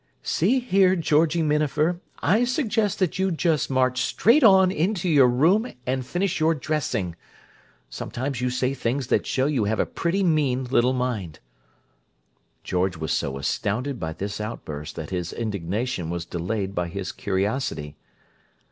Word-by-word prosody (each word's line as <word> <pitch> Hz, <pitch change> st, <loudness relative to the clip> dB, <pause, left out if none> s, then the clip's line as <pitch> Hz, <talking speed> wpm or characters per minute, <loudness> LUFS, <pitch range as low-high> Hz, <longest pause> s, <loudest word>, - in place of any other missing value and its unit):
"See 210 Hz, +11 st, +2 dB
here, 195 Hz, -6 st, +3 dB
Georgie 160 Hz, 0 st, +2 dB
Minafer, 150 Hz, +3 st, +1 dB, 0.2 s
I 220 Hz, +5 st, +3 dB
suggest 230 Hz, -, 0 dB
that 185 Hz, -1 st, -1 dB
you 190 Hz, 0 st, +2 dB
just 165 Hz, -3 st, 0 dB
march 130 Hz, -1 st, +1 dB
straight 245 Hz, +8 st, +3 dB
on 190 Hz, -4 st, +6 dB
into 185 Hz, +2 st, -1 dB
your 145 Hz, -6 st, +6 dB
room 170 Hz, -, +3 dB
and 130 Hz, 0 st, -1 dB
finish 180 Hz, +7 st, -1 dB
your 160 Hz, +1 st, +3 dB
dressing! 135 Hz, -, -2 dB, 0.7 s
Sometimes 130 Hz, 0 st, -4 dB
you 125 Hz, -, +1 dB
say 130 Hz, +1 st, 0 dB
things 130 Hz, +1 st, -2 dB
that -, -, +1 dB
show 130 Hz, -, +1 dB
you 135 Hz, -7 st, +1 dB
have 110 Hz, +2 st, -1 dB
a -, -, +3 dB
pretty 180 Hz, +4 st, -1 dB
mean 145 Hz, -7 st, +1 dB
little 125 Hz, 0 st, +2 dB
mind!" 120 Hz, -11 st, -3 dB, 1.2 s
George 90 Hz, 0 st, -1 dB
was 80 Hz, -2 st, -3 dB
so 70 Hz, 0 st, -1 dB
astounded 120 Hz, -, -2 dB
by 80 Hz, -, -3 dB
this 100 Hz, +5 st, -5 dB
outburst 75 Hz, -9 st, -6 dB
that 75 Hz, -, -6 dB
his 90 Hz, -3 st, -3 dB
indignation 100 Hz, -3 st, -3 dB
was 85 Hz, 0 st, -3 dB
delayed 95 Hz, +4 st, -3 dB
by 90 Hz, -2 st, -1 dB
his 95 Hz, +1 st, -5 dB
curiosity. 95 Hz, -, -2 dB
130 Hz, 150 wpm, -24 LUFS, -, 1.2 s, on